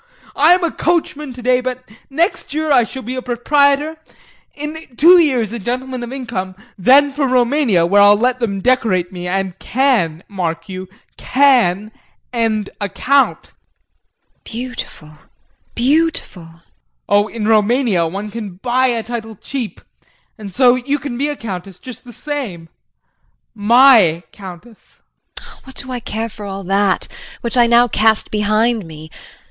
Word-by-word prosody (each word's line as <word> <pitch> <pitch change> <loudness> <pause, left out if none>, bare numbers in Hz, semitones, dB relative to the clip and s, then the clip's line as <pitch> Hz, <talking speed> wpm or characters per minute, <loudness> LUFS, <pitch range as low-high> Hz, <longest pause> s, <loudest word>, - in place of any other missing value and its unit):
I'm 345 +5 +5
a 335 - 0
coachman 300 -4 -1
today, 250 0 0
but 255 0 -5 0.2
next 320 0 -1
year 310 0 -1
I 250 -4 +5
shall 265 +3 -8
be 245 +4 -5
a 255 - -4
proprietor, 285 +5 +1 0.6
in 300 +2 -6 0.2
two 350 +4 +7
years 250 - +1
a 235 - -4
gentleman 255 +4 -4
of 240 0 -6
income; 215 -9 -5 0.2
then 275 +9 +4
for 280 0 -1
Roumania 250 - +2
where 200 +4 +4
I'll 205 0 +7
let 250 +3 0
them 200 -5 -2
decorate 210 -8 +1
me 180 -1 -6
and 190 0 -3
can, 220 - 0
mark 165 -4 -4
you, 185 -1 -7 0.3
can 235 -7 +2 0.4
end 220 -3 -1
a 205 - -1
count! 275 +7 +1
JULIE. - - -35
Beautiful, 235 -10 -7 0.6
beautiful! 275 - 0
JEAN. 165 +1 -19 0.5
Oh, 205 +1 +3
in 215 -2 -4
Roumania, 220 -4 +2
one 200 +5 -6
can 210 -5 -7
buy 250 +6 +1
a 235 -3 -1
title 225 -1 -6
cheap 245 +2 -6 0.5
and 210 -3 -9
so 245 +4 +4
you 260 +3 -1
can 275 -3 -6
be 280 +4 -1
a 295 - -3
countess 190 -6 -7
just 255 +2 -11
the 245 - -11
same 235 - -6 0.8
my 220 -6 +5
countess! 195 +3 -13 0.4
JULIE. - - -8
What 265 - -13
do 260 -2 -5
I 250 - -3
care 225 0 -4
for 210 -1 -11
all 195 0 -6
that 195 +1 +1 0.3
which 235 0 -1
I 240 -1 +5
now 240 +1 +5
cast 220 -1 +1
behind 215 +2 +1
me. 155 0 -11
235 Hz, 155 wpm, -17 LUFS, 200-265 Hz, 0.8 s, two